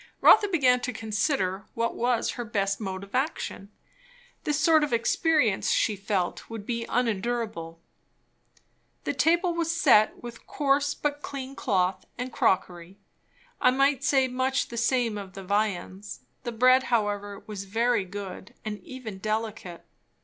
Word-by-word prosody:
Rotha 420 Hz, -1 st, +7 dB
began 265 Hz, -9 st, +3 dB
to 250 Hz, +1 st, -3 dB
consider 210 Hz, -, -1 dB
what 230 Hz, 0 st, 0 dB
was 240 Hz, 0 st, +1 dB
her 245 Hz, -, -5 dB
best 195 Hz, -3 st, -1 dB
mode 190 Hz, -2 st, -4 dB
of 200 Hz, -, -13 dB
action. 260 Hz, -7 st, -2 dB, 0.8 s
This 295 Hz, -1 st, 0 dB
sort 315 Hz, 0 st, +5 dB
of 295 Hz, -, -1 dB
experience, 235 Hz, -, +2 dB
she 215 Hz, -, +2 dB
felt, 195 Hz, -2 st, -2 dB
would 225 Hz, -3 st, -7 dB
be 230 Hz, 0 st, -3 dB
unendurable. 220 Hz, -7 st, -2 dB, 1.2 s
The -, -, -1 dB
table 345 Hz, +2 st, +2 dB
was 335 Hz, -1 st, -1 dB
set 265 Hz, -, +4 dB
with 240 Hz, -1 st, -10 dB
coarse 285 Hz, 0 st, +1 dB
but 290 Hz, 0 st, -2 dB
clean 275 Hz, -1 st, -6 dB
cloth 185 Hz, -6 st, 0 dB
and 250 Hz, +1 st, -5 dB
crockery. 180 Hz, 0 st, 0 dB, 0.6 s
I 255 Hz, -, +6 dB
might 275 Hz, +1 st, +2 dB
say 270 Hz, -2 st, +3 dB
much 260 Hz, +2 st, -1 dB
the 235 Hz, -, -7 dB
same 235 Hz, -2 st, +1 dB
of 190 Hz, -2 st, -9 dB
the 195 Hz, 0 st, -8 dB
viands. 200 Hz, -2 st, -2 dB, 0.2 s
The 240 Hz, -, -2 dB
bread 255 Hz, +3 st, +4 dB
however 205 Hz, -3 st, -1 dB
was 205 Hz, -2 st, -6 dB
very 230 Hz, +2 st, +1 dB
good, 190 Hz, 0 st, -8 dB
and 210 Hz, -1 st, -4 dB
even 230 Hz, -7 st, -8 dB
delicate. 215 Hz, -4 st, -4 dB
230 Hz, 145 wpm, -27 LUFS, 200-260 Hz, 1.2 s, Rotha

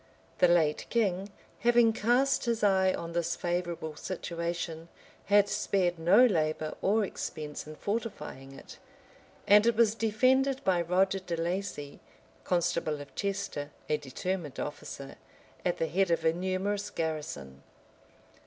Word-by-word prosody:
The 180 Hz, -, +6 dB
late 165 Hz, -3 st, +2 dB
king, 200 Hz, -4 st, 0 dB, 0.3 s
having 235 Hz, -1 st, +4 dB
cast 245 Hz, +6 st, +2 dB
his 230 Hz, -2 st, -1 dB
eye 190 Hz, -2 st, +4 dB
on 170 Hz, -2 st, -5 dB
this 170 Hz, 0 st, 0 dB
favorable 175 Hz, -3 st, -3 dB
situation, 170 Hz, -1 st, -4 dB, 0.4 s
had 205 Hz, 0 st, +5 dB
spared 180 Hz, -5 st, 0 dB
no 190 Hz, +10 st, +6 dB
labor 155 Hz, -7 st, 0 dB
or 210 Hz, +2 st, +2 dB
expense 150 Hz, -5 st, -6 dB
in 155 Hz, -, -8 dB
fortifying 195 Hz, -, -4 dB
it; 135 Hz, -, -12 dB, 0.7 s
and 210 Hz, +2 st, +6 dB
it 235 Hz, -, +3 dB
was 225 Hz, -2 st, +4 dB
defended 260 Hz, +5 st, +2 dB
by 180 Hz, -2 st, +2 dB
Roger 190 Hz, +3 st, +2 dB
de 175 Hz, -2 st, -4 dB
Laci, 165 Hz, -4 st, -3 dB, 0.5 s
constable 170 Hz, -4 st, 0 dB
of 145 Hz, -1 st, -10 dB
Chester, 200 Hz, -8 st, -3 dB, 0.2 s
a 150 Hz, -, +2 dB
determined 150 Hz, +2 st, -4 dB
officer, 140 Hz, -1 st, -6 dB, 0.5 s
at 180 Hz, -, 0 dB
the -, -, 0 dB
head 190 Hz, +3 st, +1 dB
of 170 Hz, -, +1 dB
a 160 Hz, -, +4 dB
numerous 190 Hz, +3 st, -2 dB
garrison. 145 Hz, -, -4 dB
180 Hz, 135 wpm, -30 LUFS, 160-205 Hz, 0.7 s, The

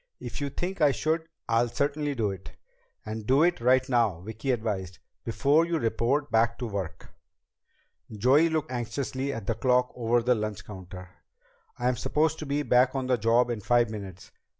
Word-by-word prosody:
"If -, -, -6 dB
you 140 Hz, -, -1 dB
think 175 Hz, +5 st, -4 dB
I 150 Hz, -, +6 dB
should, 160 Hz, +3 st, -1 dB, 0.2 s
I'll 115 Hz, +1 st, +2 dB
certainly 145 Hz, +3 st, -1 dB
do 110 Hz, -5 st, 0 dB
it." 95 Hz, -1 st, -10 dB, 0.5 s
"And 110 Hz, 0 st, -6 dB
do 135 Hz, +4 st, +4 dB
it 175 Hz, -6 st, +2 dB
right 130 Hz, +2 st, +3 dB
now," 115 Hz, -, +2 dB
Vicki 110 Hz, +7 st, -6 dB
advised, 105 Hz, -7 st, -2 dB, 0.3 s
"before 140 Hz, +8 st, +3 dB
you 170 Hz, 0 st, -1 dB
report 135 Hz, +3 st, 0 dB
back 115 Hz, 0 st, +2 dB
to 125 Hz, -, -4 dB
work." 95 Hz, -6 st, -5 dB, 1.0 s
Joey 130 Hz, +10 st, +4 dB
looked 155 Hz, -3 st, -2 dB
anxiously 130 Hz, +2 st, -3 dB
at 115 Hz, -6 st, -6 dB
the 115 Hz, -, 0 dB
clock 125 Hz, +2 st, +2 dB
over 120 Hz, 0 st, +1 dB
the 125 Hz, +1 st, +4 dB
lunch 110 Hz, -3 st, -4 dB
counter. 90 Hz, -2 st, -10 dB, 0.7 s
"I'm 125 Hz, 0 st, 0 dB
supposed 160 Hz, +1 st, 0 dB
to 155 Hz, -, -6 dB
be 145 Hz, +1 st, 0 dB
back 125 Hz, 0 st, +3 dB
on 135 Hz, -1 st, -1 dB
the 125 Hz, -1 st, +2 dB
job 120 Hz, +3 st, +3 dB
in 115 Hz, -3 st, -4 dB
five 120 Hz, +1 st, +2 dB
minutes. 100 Hz, -4 st, -8 dB
120 Hz, 175 wpm, -27 LUFS, 110-140 Hz, 1.0 s, I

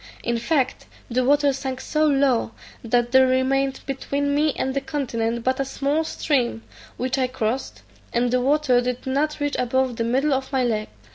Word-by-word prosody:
In 235 Hz, 0 st, 0 dB
fact, 265 Hz, 0 st, 0 dB, 0.2 s
the 255 Hz, +2 st, +2 dB
water 285 Hz, +1 st, +3 dB
sunk 265 Hz, -1 st, -4 dB
so 310 Hz, +2 st, +1 dB
low, 270 Hz, -5 st, +2 dB, 0.3 s
that 240 Hz, +1 st, +1 dB
there 260 Hz, 0 st, +6 dB
remained 265 Hz, +1 st, +1 dB
between 280 Hz, +1 st, -2 dB
me 300 Hz, +1 st, +2 dB
and 265 Hz, -, -1 dB
the 275 Hz, -, -1 dB
continent 235 Hz, -5 st, -2 dB
but 260 Hz, +2 st, 0 dB
a -, -, +2 dB
small 280 Hz, +3 st, -1 dB
stream, 250 Hz, -8 st, -1 dB, 0.3 s
which 255 Hz, +2 st, -1 dB
I 255 Hz, -, +2 dB
crossed, 250 Hz, 0 st, -3 dB, 0.3 s
and 240 Hz, 0 st, +1 dB
the 250 Hz, 0 st, +2 dB
water 270 Hz, -2 st, +3 dB
did 250 Hz, 0 st, -3 dB
not 290 Hz, +4 st, 0 dB
reach 290 Hz, 0 st, -1 dB
above 250 Hz, 0 st, 0 dB
the 230 Hz, -, 0 dB
middle 265 Hz, +5 st, +1 dB
of 265 Hz, 0 st, -2 dB
my 265 Hz, -2 st, +1 dB
leg. 215 Hz, -3 st, -1 dB
260 Hz, 185 wpm, -23 LUFS, 245-280 Hz, 0.3 s, there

